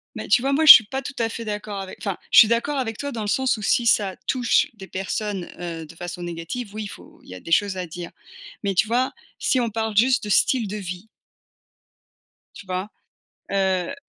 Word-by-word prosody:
Mais - - -6
tu 245 - +4
vois 275 +2 0
moi 315 +3 +2
je 305 - +14
suis 220 - +6
pas 265 +6 -4
tout 280 - -7
à 230 -1 +1
fait 230 0 -6
d'accord 210 -1 -5
avec 190 - -9
enfin, 200 -3 -3
je - - +8
suis 220 - +9
d'accord 235 +6 0
avec 225 -4 -3
toi 285 0 -4
dans 230 - -5
le 210 - -4
sens 255 +3 +1
où - - -8
si 235 +4 +1
ça 200 -4 +2
touche 255 +3 +2
des 195 -4 -11
personnes, 195 0 -4
heu, 165 -2 -6
de 155 - -14
façon 175 +1 -7
négative, 175 +6 -6
oui 215 0 -5
il - - -5
faut - - -14
il - - -18
y 95 - -8
a - - -9
des 165 - -10
choses 200 +2 +2
à 180 - -3
dire, 175 +1 -8 0.5
mais 200 -1 0
tu 190 +4 +2
vois, 245 +3 +1 0.3
si 260 - +1
on 235 -2 0
parle 220 0 -3
juste 250 +5 +3
de 210 - -5
style 230 +2 +2
de 205 +2 -5
vie. 185 +1 -7 1.5
Tu - - -12
vois? 185 +2 -3 0.6
Heu 190 +3 0
210 Hz, 235 wpm, -23 LUFS, 185-235 Hz, 1.5 s, je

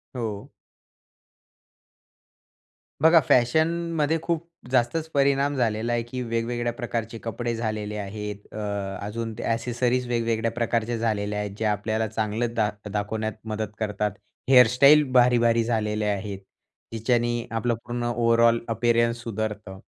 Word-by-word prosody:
हो. 110 -5 -4 2.5
बघा 165 +2 +7
फॅशनमध्ये 160 +4 +2
खूप 170 0 -2 0.2
जास्तच 130 +6 +1
परिणाम 140 0 +2
झालेला 115 -2 0
आहे, 120 0 0
की 125 +2 -6
वेगवेगळ्या 120 0 -1
प्रकारचे 115 -1 -4
कपडे 120 +1 -3
झालेले 110 -2 -3
आहेत. 105 0 -6
अ, - - -7 0.5
अजून 115 +2 -4
ते - - -5
एक्सेसरीज 120 +2 -1
वेगवेगळ्या 115 -1 0
प्रकारच्या 115 0 -1
झालेल्या 105 -2 -1
आहेत. 105 -1 -3
जे 110 - -2
आपल्याला 110 +1 0
चांगलं 110 +2 -2
दाख 105 -2 -1
दाखवण्यात 110 +1 -2
मदत 110 -1 -4
करतात. 105 -1 -1 0.4
हेअरस्टाईल 130 +4 +7
भारीभारी 120 -2 +4
झालेले 110 -2 -1
आहेत, 100 -1 -2 0.5
जिच्याने 120 +1 0
आपलं 115 +1 0
पूर्ण 120 0 -3
ओव्हरऑल 115 0 +4
अपअरन्स 115 +1 +1
सुधारतं. 105 -3 -4
115 Hz, 115 wpm, -25 LUFS, 110-120 Hz, 2.5 s, बघा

